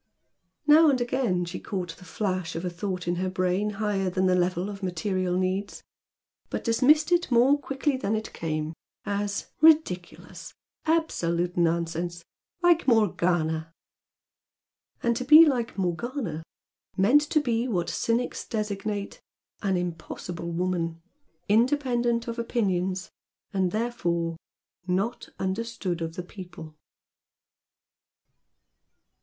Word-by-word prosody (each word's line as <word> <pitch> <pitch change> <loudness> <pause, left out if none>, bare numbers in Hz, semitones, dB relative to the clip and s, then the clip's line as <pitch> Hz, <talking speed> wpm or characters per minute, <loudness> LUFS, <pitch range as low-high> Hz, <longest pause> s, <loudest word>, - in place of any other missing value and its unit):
Now 310 +2 +7
and 265 -3 +2
again 240 -8 0
she 175 +2 -6
caught 180 -4 -4
the 180 - -14
flash 185 -2 -2
of 165 +2 -3
a 180 - -2
thought 180 0 -4
in 175 0 0
her 185 +1 -1
brain 185 +2 0
higher 200 -3 0
than 185 +1 0
the 185 - +4
level 180 +1 +1
of 205 -1 -7
material 185 0 -1
needs, 185 +2 -2 0.7
but - - -3
dismissed 290 +8 +4
it 350 0 +3
more 250 +3 +5
quickly 275 0 -1
than 220 -4 -1
it 215 0 -4
came 155 -1 -3 0.3
as 200 0 -2
"Ridiculous! 305 - +2 0.3
Absolute 175 - 0
nonsense! 170 0 0 0.4
Like 345 -3 +4
Morgana!" 175 -8 +2 1.3
And 235 0 +2
to - - -2
be 305 +5 +9
like 245 -8 0
Morgana, 190 - -2 0.6
meant 235 +10 +5
to 310 - +3
be 240 -4 0
like 240 - -2
what 170 -1 0
cynics 235 +2 -1
designate 210 -2 -3 0.4
"an 195 -3 +1
impossible 170 0 -5
woman," 170 -1 -1 0.5
independent 240 0 +2
of 235 0 -4
opinions 190 -6 -1 0.4
and 190 -2 +1
therefore 170 -8 -1 0.5
"not 195 +6 -1
understood 190 -3 -3
of 165 0 -4
the 180 - -4
people." 175 -4 -10
190 Hz, 120 wpm, -27 LUFS, 175-235 Hz, 1.3 s, be